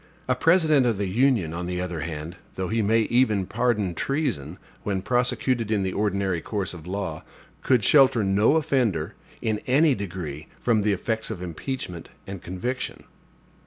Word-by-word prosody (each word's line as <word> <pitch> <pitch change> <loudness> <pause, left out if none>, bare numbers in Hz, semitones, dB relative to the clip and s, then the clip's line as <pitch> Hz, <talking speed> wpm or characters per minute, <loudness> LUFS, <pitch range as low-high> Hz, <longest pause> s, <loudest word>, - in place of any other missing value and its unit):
A 130 - +3
President 155 -2 +4
of 115 -4 +1
the 100 - -1
Union, 115 - +2
on 85 +1 -4
the 90 0 -2
other 90 -2 -3
hand, 80 +1 -5 0.2
though 95 -1 -3
he 115 0 +1
may 110 +2 +3
even 110 -4 +2
pardon 110 -3 0
treason, 90 - -2 0.2
when 95 -2 -2
prosecuted 125 -1 0
in 105 -3 +1
the 95 -1 -2
ordinary 100 -4 0
course 100 -5 -3
of 85 -1 -10
law, 95 -5 -4 0.4
could 125 -5 +3
shelter 130 -3 +5
no 100 +8 +3
offender, 125 - +1 0.3
in 110 -2 0
any 145 +4 +4
degree, 85 - -5
from 115 -3 +2
the 105 +1 +2
effects 110 +3 -2
of 95 -5 -5
impeachment 90 - -5 0.2
and 95 -2 -7
conviction. 120 +9 -4
105 Hz, 160 wpm, -25 LUFS, 90-125 Hz, 0.4 s, shelter